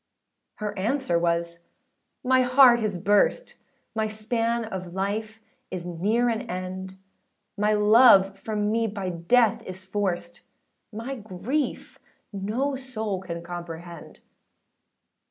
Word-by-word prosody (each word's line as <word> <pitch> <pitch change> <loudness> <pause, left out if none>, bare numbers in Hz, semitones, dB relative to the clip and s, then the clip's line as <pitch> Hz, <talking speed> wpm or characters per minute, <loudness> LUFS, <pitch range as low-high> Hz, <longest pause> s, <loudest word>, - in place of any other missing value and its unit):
â - - -55 0.6
Her 205 -2 -3
answer 220 -5 0
was, 170 0 -1 0.7
âMy 260 0 +4
heart 250 -1 +6
is 210 -4 -2
burst, 205 - +1 0.4
My 220 -1 0
span 230 +2 -1
of 185 -4 -7
life 215 +3 -3 0.3
is 180 -2 -5
near 205 +8 0
an 225 -2 0
end; 185 +1 -5 0.6
My 210 +1 +2
love 210 -2 +6
from 210 -1 -2
me 225 0 +1
by 200 -3 -4
death 210 +7 +2
is 185 0 -9
forced, 195 +4 -3 0.5
My 230 +5 -5
grief 225 +5 -4 0.3
no 225 +8 -1
soul 220 -7 -4
can 170 -3 -6
comprehend. 170 0 -9
210 Hz, 120 wpm, -25 LUFS, 185-230 Hz, 0.7 s, heart